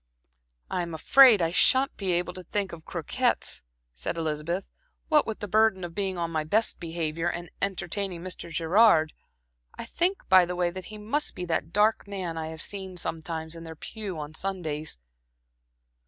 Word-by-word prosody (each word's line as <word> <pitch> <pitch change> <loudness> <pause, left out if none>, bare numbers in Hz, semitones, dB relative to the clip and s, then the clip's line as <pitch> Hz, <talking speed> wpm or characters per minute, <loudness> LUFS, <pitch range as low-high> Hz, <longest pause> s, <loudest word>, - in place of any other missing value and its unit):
"I'm 170 -2 -2
afraid 230 - +7
I 165 - +1
shan't 260 +9 +4
be 190 -3 -1
able 175 +1 0
to 185 - -7
think 200 -1 -2
of 160 -1 -10
croquettes," - - 0 0.3
said 60 - -4
Elizabeth, 160 +3 -2 0.4
"what 305 -2 +4
with 220 - -4
the 205 - -3
burden 215 -2 +3
of 175 -1 -5
being 195 -2 -2
on 170 -1 -2
my 155 -1 0
best 215 +9 +1
behavior 165 0 -2
and 175 -1 -6
entertaining 190 -2 -2
Mr. 185 -2 -4
Gerard. 165 0 +4 0.6
I - - -6
think 365 +3 -1
by 185 -1 +7
the 180 +1 -4
way, 175 -1 +1
that 185 0 -8
he 215 - -9
must 230 +9 -2
be 180 - -4
that 160 -2 -1
dark 210 +3 +2
man 185 -4 -4
I 160 -1 -3
have 160 -1 -4
seen 190 -2 -5
sometimes 160 -1 -4
in 165 - -9
their 160 -1 -8
pew 200 +2 -6
on 150 0 -6
Sundays. 160 - -3
175 Hz, 175 wpm, -27 LUFS, 165-200 Hz, 0.6 s, afraid